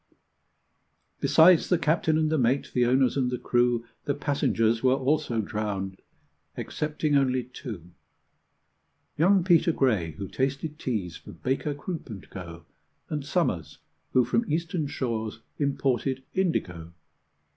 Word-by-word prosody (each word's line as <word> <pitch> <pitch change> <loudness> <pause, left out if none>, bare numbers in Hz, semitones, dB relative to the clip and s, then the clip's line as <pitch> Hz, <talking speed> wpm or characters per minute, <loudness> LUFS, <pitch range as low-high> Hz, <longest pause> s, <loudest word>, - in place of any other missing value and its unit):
Besides 165 +1 +5
the 180 - +4
captain 160 -1 +2
and 155 -1 +1
the 160 - +2
mate, 130 +3 +1
the 125 -1 +3
owners 130 0 +3
and 130 -3 +1
the 125 - -2
crew, 120 -1 +1 0.2
The 145 - 0
passengers 115 -6 +1
were 130 0 +4
also 135 -3 0
drowned 100 -3 -4 0.6
excepting 150 -1 -1
only 130 -2 +2
two: 115 - -9 1.2
Young 185 +3 +4
Peter 170 -2 +4
Gray, 105 - +1
who 95 +5 -6
tasted 135 - -2
teas 95 - -3
for - - -12
Baker, 135 +3 -2
Croop, 160 0 -6
and 100 -4 -8
Co., 85 -2 -9 0.5
And 150 -2 -2
Somers, 95 - -1 0.4
who 125 -1 +5
from 230 - 0
Eastern 165 -1 -1
shores 115 -6 -3 0.2
imported 135 -2 0
indigo. 90 - -1
130 Hz, 130 wpm, -27 LUFS, 110-155 Hz, 1.2 s, Besides